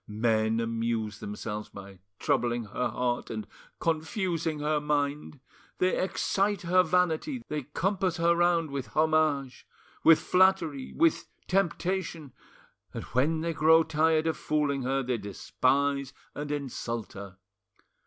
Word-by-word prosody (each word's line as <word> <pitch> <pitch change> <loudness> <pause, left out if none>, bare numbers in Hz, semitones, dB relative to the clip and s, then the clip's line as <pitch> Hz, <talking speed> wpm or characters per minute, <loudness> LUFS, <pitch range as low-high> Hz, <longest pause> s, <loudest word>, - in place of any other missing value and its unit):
Men 110 +1 +1
amuse 115 -2 -2
themselves 105 +1 -5
by 100 -1 -11 0.2
troubling 120 0 0
her 110 +4 -2
heart 125 -1 -2
and 110 -2 -4 0.3
confusing 165 0 -1
her 150 +1 +1
mind; 145 -1 -2 0.4
they 185 0 +2
excite 195 +1 0
her 180 +2 +4
vanity, 180 - 0
they 150 -3 -3
compass 185 +1 0
her 170 0 +3
round 170 -3 +2
with 135 -2 -4
homage, 155 -4 +1 0.4
with 165 -1 +8
flattery, 180 -7 +2
with 330 0 +2 0.2
temptation, 180 -5 -1 0.6
and - - -4
when 155 +6 +2
they 165 0 -1
grow 160 +1 +5
tired 160 0 +2
of 160 - 0
fooling 145 -2 0
her, 135 +1 0
they 125 -2 -1
despise 135 +7 0 0.2
and 145 0 -5
insult 120 -5 -4
her. 100 -1 -9
150 Hz, 125 wpm, -28 LUFS, 120-170 Hz, 0.6 s, with